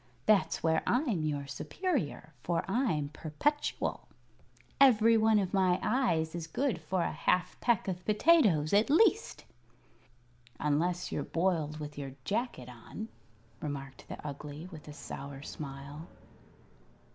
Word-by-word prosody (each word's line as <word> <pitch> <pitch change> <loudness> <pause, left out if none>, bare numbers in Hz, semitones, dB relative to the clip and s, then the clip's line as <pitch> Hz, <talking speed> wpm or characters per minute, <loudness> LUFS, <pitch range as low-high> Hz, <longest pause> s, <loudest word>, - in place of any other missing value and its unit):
That's 215 -3 +3
where 160 0 +3
I'm 245 - +1
your 145 -2 -2
superior, 160 - -3
for 170 -1 0
I'm 190 - 0
perpetual. 165 - -2 0.7
Every 230 -4 +6
one 220 -1 +4
of 195 -2 0
my 185 -2 +3
eyes 190 -11 +1
is 170 -2 -5
good 240 - -1
for 175 +3 -1
a - - -1
half 180 -1 +1
peck 240 -4 +2
of 180 -1 -3
potatoes, 210 - +4
at 210 +5 +4
least." 420 +8 +3 1.1
"Unless 170 +5 0
you're - - -1
boiled 165 -4 0
with 150 -1 -7
your 135 -2 -6
jacket 215 - -2
on," 125 - -8 0.5
remarked 135 -3 -6
the - - -6
Ugly, 150 +3 -7
with 155 -3 -11
a 150 - -8
sour 140 -1 -8
smile. 140 +2 -8
170 Hz, 130 wpm, -31 LUFS, 150-220 Hz, 1.1 s, Every